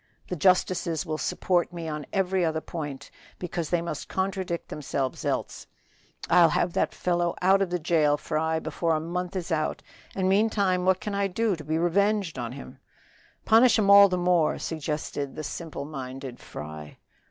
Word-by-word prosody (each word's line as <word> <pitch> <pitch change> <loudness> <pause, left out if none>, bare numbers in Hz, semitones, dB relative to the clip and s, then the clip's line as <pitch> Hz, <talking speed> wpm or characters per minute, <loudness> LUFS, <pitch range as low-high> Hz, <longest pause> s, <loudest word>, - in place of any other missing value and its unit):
The 180 - -2
justices 180 0 +2
will 155 -1 -3
support 175 -2 0
me 170 -2 -6
on 150 -1 -5
every 190 -2 +1
other 160 -1 0
point, 150 -4 -7 0.3
because 170 -3 -4
they 175 -1 +1
must 160 -4 -5
contradict 190 -2 -2
themselves 135 -3 -3
else. - - -3 0.6
I'll 170 -2 +6
have 170 - 0
that - - +1
fellow 175 -1 0
out 190 +2 +4
of 195 - +1
the 180 - 0
jail, 155 -3 +2
Fry, 160 +1 -1
before 160 +1 -1
a - - 0
month 180 +3 -4
is 180 -1 -4
out, 155 -1 -1 0.3
and 190 -1 0
meantime 195 -2 +2
what 190 0 +3
can 210 - -4
I 200 0 +1
do 210 +2 0
to 155 - -10
be 155 +2 -1
revenged 190 -1 +1
on 120 0 -4
him?" 135 -1 -10 0.7
"Punish 230 +3 +6
'em 200 -2 +3
all 200 0 +9
the 180 - 0
more," 175 -3 +2
suggested 150 -3 -4
the 155 - -5
simple 155 -3 -6
minded 135 -3 -7
Fry. 75 0 -9
170 Hz, 175 wpm, -26 LUFS, 155-185 Hz, 0.7 s, all